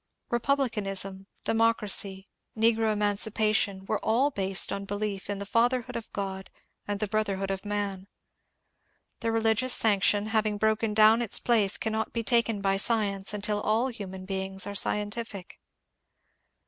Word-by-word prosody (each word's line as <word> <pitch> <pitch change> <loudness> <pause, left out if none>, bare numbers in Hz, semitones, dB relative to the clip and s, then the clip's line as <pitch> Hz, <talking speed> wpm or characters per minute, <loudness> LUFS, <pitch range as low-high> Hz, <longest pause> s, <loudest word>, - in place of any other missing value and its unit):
Republicanism, 205 -7 -2 0.2
democracy, 210 -4 +1 0.3
negro 225 0 +2
emancipation, 205 -1 +1
were - - -3
all 255 +6 +2
based 195 -4 +2
on 200 0 -4
belief 205 0 -4
in 205 - -2
the 200 - -6
fatherhood 245 +3 0
of 230 -1 -6
God 190 -1 -5 0.4
and 205 -1 -3
brotherhood 195 -3 -1
of 195 0 -4
man. 205 -2 -4 1.1
The 230 - -4
reli 225 0 +2
gious 255 +4 -2
sanction 205 0 +2
having 215 -1 0
broken 220 0 0
down 220 +2 +6
its 230 - +3
place 215 -5 +1
cannot 220 0 -3
be 230 - -2
taken 230 -3 +1
by 195 0 +1
science 200 -2 0
until 210 0 -2
all 225 +5 0
human 190 -5 -8
beings 190 0 -1
are 205 - -6
scientific. 205 -1 -1
210 Hz, 135 wpm, -27 LUFS, 195-225 Hz, 1.1 s, down